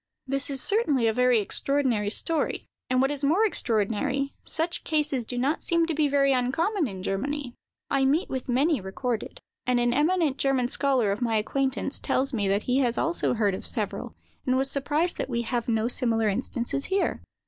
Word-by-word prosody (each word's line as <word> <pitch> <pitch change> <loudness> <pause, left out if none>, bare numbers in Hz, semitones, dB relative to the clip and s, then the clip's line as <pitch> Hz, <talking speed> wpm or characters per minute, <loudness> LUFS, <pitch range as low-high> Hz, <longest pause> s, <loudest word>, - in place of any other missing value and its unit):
This 275 +1 +1
is 270 -2 -2
certainly 305 - +2
a 220 - +2
very 250 0 +3
extraordinary 240 -1 0
story; 320 +8 0 0.2
and 255 +1 +3
what 270 - +1
is 285 -1 -2
more 340 +10 +3
extraordinary, 260 - 0
such 330 +2 -1
cases 295 -6 0
do 245 - -3
not 275 +6 0
seem 335 -1 +1
to 325 - -2
be 305 -1 +2
very 275 -1 +3
uncommon 300 - 0
in 190 -4 -7
Germany. 255 +7 -3 0.4
I 270 -1 +2
meet 300 +8 +2
with 260 -1 -5
many 275 +2 +2
recorded: 220 +5 -4 0.3
and 250 -1 +3
an 240 0 +2
eminent 305 0 +2
German 265 -3 +1
scholar 260 -7 +1
of 200 - -3
my 230 -2 +1
acquaintance 265 +5 0
tells 270 +2 0
me 205 -4 0
that 200 +2 +1
he 255 +2 +1
has 245 -3 +1
also 335 -5 +1
heard 210 -3 +1
of 185 - -5
several, - - -3 0.3
and 255 0 +1
was 270 +1 0
surprised 295 +5 0
that - - -2
we 235 -2 -1
have 235 0 -2
no 225 0 +1
similar 230 -3 +1
instances 240 +5 -2
here. 385 +1 -1
265 Hz, 190 wpm, -26 LUFS, 235-290 Hz, 0.4 s, very